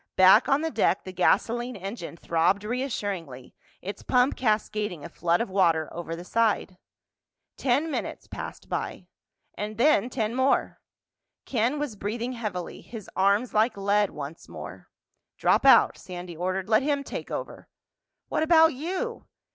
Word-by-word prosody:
Back 190 +5 +6
on 275 +2 +3
the 325 0 -2
deck 210 -4 +1
the 185 - -8
gasoline 235 +7 +1
engine 195 -3 -7
throbbed 170 +5 +1
reassuringly, 205 - -4 0.3
its 200 +2 -6
pump 250 +1 +2
cascading 210 - -1
a - - -7
flood 170 +2 +1
of 230 - -2
water 165 -5 +2
over 165 -1 -5
the 170 - -8
side. 210 -3 0 0.8
Ten 280 +5 +1
minutes - - -4
passed - - -8
by—then 225 +3 -2
ten 225 -3 -2
more. 260 +2 +1 0.7
Ken 245 +4 0
was 290 -7 -3
breathing 225 +5 -3
heavily, 210 -7 -5
his 220 -4 -10
arms 200 +6 +2
like 220 +1 +2
lead 200 0 +2
once 150 +2 -8
more. 85 +3 -9 0.5
"Drop - - +3
out," - - +6
Sandy 180 -2 -8
ordered. 185 +3 -2
"Let 220 +1 +4
him 285 0 0
take - - -6
over." - - -6 0.6
"What - - -1
about 320 0 +5
you?" 375 - -4
210 Hz, 140 wpm, -26 LUFS, 180-250 Hz, 0.8 s, Back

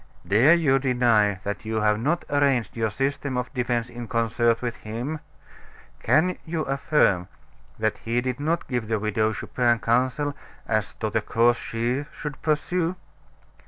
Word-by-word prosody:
Dare 125 +12 +6
you 140 -6 +3
deny 120 -7 +2
that 100 +1 -4
you 110 0 -1
have 105 0 +2
not 155 +9 0
arranged 140 -5 +2
your 110 -1 0
system 135 +2 -2
of 125 +2 -3
defense 120 -2 -1
in 120 -1 -8
concert 115 0 +1
with 120 -2 -4
him? 120 +8 -5 0.8
Can 180 +4 +2
you 160 -1 -2
affirm 135 - +2 0.5
that 110 -1 -1
he 115 +2 -1
did 125 +1 -2
not 165 +3 -1
give 120 -4 -2
the 110 0 +1
Widow 110 +1 0
Chupin 120 +2 +1
counsel 130 +6 0 0.3
as 110 -1 -1
to 110 -1 -3
the 110 - +1
course 115 +3 +3
she 120 +5 -2
should 150 -1 -7
pursue?" 165 +3 0
120 Hz, 155 wpm, -25 LUFS, 110-140 Hz, 0.8 s, Dare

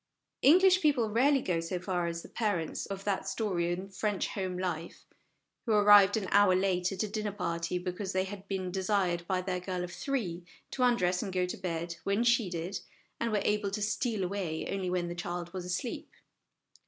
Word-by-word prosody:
English 370 +5 +6
people 255 -8 +2
rarely 270 +4 +3
go 175 -3 0
so 165 +2 -3
far 180 -1 -1
as 170 0 -4
the - - -10
parents 200 -9 -2
of 195 0 -5
that 195 -1 -1
story 195 -4 -1
in 185 +2 -3
French 195 +1 -2
Home 185 -2 -3
Life, 175 -3 -4 0.6
who 225 - +3
arrived 205 -1 +7
an 200 -3 -2
hour 200 -2 +6
late 185 -1 +1
at 195 - -2
a - - -1
dinner 210 0 -3
party, 170 -3 -2
because 180 +2 -4
they 185 -1 +1
had 195 0 -8
been 185 -2 -3
desired 185 -2 0
by 185 -1 0
their 185 -1 -2
girl 180 -1 -3
of 175 - -6
three 195 - -3 0.3
to 260 - -4
undress 185 -8 +3
and 195 - -4
go 180 -1 +1
to 180 - -4
bed 170 -1 -4
when 200 +4 +1
she 235 -4 +3
did, 175 +3 -4 0.4
and 230 -1 -1
were 205 -2 +1
able 210 -1 +1
to 205 +2 -4
steal 215 -1 -1
away 180 -4 -3
only 190 -2 -2
when 180 -1 -1
the 170 - -4
child 175 0 -5
was 185 -2 -5
asleep. 185 +8 -3
190 Hz, 200 wpm, -30 LUFS, 180-210 Hz, 0.6 s, arrived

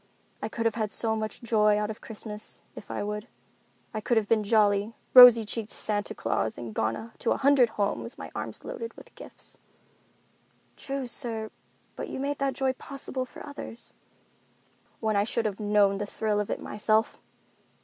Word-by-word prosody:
I - - -3
could 230 +1 -3
have 225 - +3
had 215 -2 -2
so 220 -1 +1
much 220 +2 -4
joy 210 -2 +3
out 210 +1 -1
of 215 - -10
Christmas, 215 -1 -6
if - - -11
I - - -3
would. 210 +2 -4 0.7
I 215 - -3
could 235 +2 +1
have 215 -2 +2
been 225 0 +4
a - - -3
jolly, 205 0 +2 0.2
rosy 245 -3 +11
cheeked 215 +1 -3
Santa 205 -1 -2
Claus 115 -1 -1
and 115 -2 -6
gone 115 - -2
to 230 - -1
a - - -3
hundred 275 -3 +5
homes, 210 +4 -1
my - - -8
arms - - -6
loaded 465 -2 -6
with - - -15
gifts." - - -12 1.2
"True, 275 -1 -4
sir, 225 -3 -3 0.4
but - - -5
you - - -5
made 285 +1 -2
that 275 -1 0
joy 265 -1 +1
possible 265 -1 -5
for - - -11
others." 285 -5 -8 1.1
"When 220 -1 +1
I 200 - +4
should 225 +1 -1
have 205 -1 -2
known 205 -2 +3
the 205 - -3
thrill 210 0 -1
of 210 - -2
it - - -2
myself. 215 +1 0
220 Hz, 180 wpm, -28 LUFS, 210-240 Hz, 1.2 s, rosy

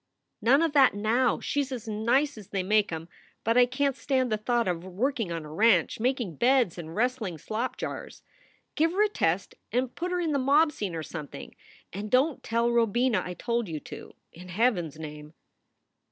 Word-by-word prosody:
"None 275 +7 +4
of 325 -3 0
that, 270 -7 +5
now! 225 +4 +1
She 285 - -1
s 275 -1 -5
as 240 -4 -6
nice 240 +7 +1
as 210 -4 -11
they 195 -2 -2
make 210 +1 +2
em. 165 0 -5 0.4
But 230 +1 +1
I 250 0 +6
can 275 +2 0
t - - -21
stand 260 -3 0
the 215 - +2
thought 235 +1 0
of 175 -2 -1
her 185 - -10
working 225 +1 -1
on 165 -2 -4
a 150 - -9
ranch, 205 -1 +3
making 240 - -1
beds 245 -8 +3
and 165 0 -8
wrestling 230 -7 -1
slop 230 - -3
jars. - - -6 0.5
Give 325 +2 +1
her 410 +3 +3
a - - +4
test 180 - 0 0.2
and 250 +2 0
put 355 +1 -3
her 360 - 0
in 335 -3 0
the 280 - +1
mob 290 +4 +4
scene 200 - -4
or 160 - -4
something. 150 -2 -8 0.4
And 205 +3 -5
don 265 +6 +3
t - - -26
tell 235 +1 0
Robina 235 +1 +2
I 180 - -6
told 235 +1 -2
you 155 -2 -4
to, - - -10 0.2
in 180 +2 -12
Heaven 195 -3 +1
s 150 - -13
name." 150 0 -9
230 Hz, 210 wpm, -27 LUFS, 180-260 Hz, 0.5 s, I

